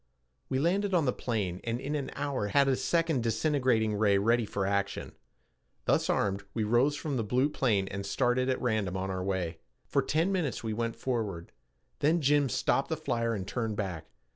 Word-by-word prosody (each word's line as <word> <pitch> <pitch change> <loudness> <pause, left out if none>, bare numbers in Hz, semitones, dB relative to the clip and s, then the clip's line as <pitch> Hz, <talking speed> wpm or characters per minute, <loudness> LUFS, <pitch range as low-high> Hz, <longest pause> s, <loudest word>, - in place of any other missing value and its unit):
We 130 - 0
landed 190 +6 +1
on 165 -4 +3
the 125 - +2
plain 100 -7 -2
and 115 +1 -2
in 140 +3 -4
an 145 -3 -2
hour 140 -7 -2
had 140 +6 +3
a 135 - +3
second 165 +1 +1
disintegrating 115 -2 +1
ray 100 -1 +3
ready 115 +3 +2
for 100 -1 -2
action. 100 0 -1 0.7
Thus - - +2
armed, 100 0 +1
we 110 - +1
rose 120 +7 +3
from 145 -2 -3
the 115 - 0
blue 125 +7 +2
plain 105 -9 +1
and 100 +1 -4
started 125 +6 +1
at 130 - 0
random 110 -6 0
on 95 +1 -2
our 95 -1 -3
way. 90 -4 -2 0.3
For - - +1
ten 165 +6 +1
minutes 170 -12 -1
we 110 -1 -2
went 115 +1 -2
forward. 105 -10 -3 0.5
Then 160 +4 +3
Jim 145 -2 +3
stopped - - +1
the - - -1
flyer 115 -1 -1
and 95 -3 -5
turned 115 -2 -2
back. 95 -7 -4
115 Hz, 190 wpm, -30 LUFS, 100-140 Hz, 0.7 s, on